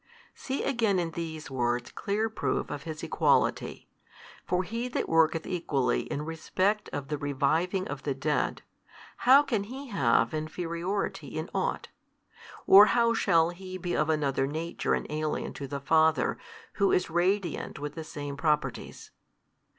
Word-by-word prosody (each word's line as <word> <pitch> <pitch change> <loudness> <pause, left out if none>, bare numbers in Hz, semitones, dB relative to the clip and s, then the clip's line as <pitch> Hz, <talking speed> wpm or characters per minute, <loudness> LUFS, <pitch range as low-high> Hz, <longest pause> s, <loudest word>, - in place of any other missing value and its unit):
See 270 +1 -4
again 230 -7 +1
in 170 -2 -1
these 160 -3 -6
words 120 -2 -1
clear 210 +3 -1
proof 160 -12 -2
of 145 -1 -6
His 155 -1 -6
Equality. - - +1 0.6
For 180 +1 +1
He 230 +6 -3
That 250 - -2
worketh 165 0 +3
equally 140 - -1
in 145 - -2
respect 185 +6 -1
of 140 -1 -5
the 150 -1 -2
reviving 155 +7 0
of 140 -1 -5
the 140 -2 -2
dead, 150 +2 -1 0.7
how 275 +2 +9
can 220 -8 -1
He 265 +4 -8
have 120 - +2
inferiority 170 +5 -3
in - - -4
ought? - - -2 0.8
or 200 +2 +9
how 235 -1 +4
shall 170 -7 +3
He 185 +1 -8
be 175 -1 -3
of 150 +1 +1
another 140 -3 +1
nature 160 +4 -1
and - - -4
alien 155 0 -3
to 140 - -6
the 140 +1 -4
Father 160 -1 +2 0.4
Who 200 -1 +3
is 180 -2 +1
radiant 180 +2 0
with 145 +1 -5
the 160 - -6
Same 145 -2 -6
Properties? 150 +1 -2
165 Hz, 150 wpm, -28 LUFS, 145-195 Hz, 0.8 s, how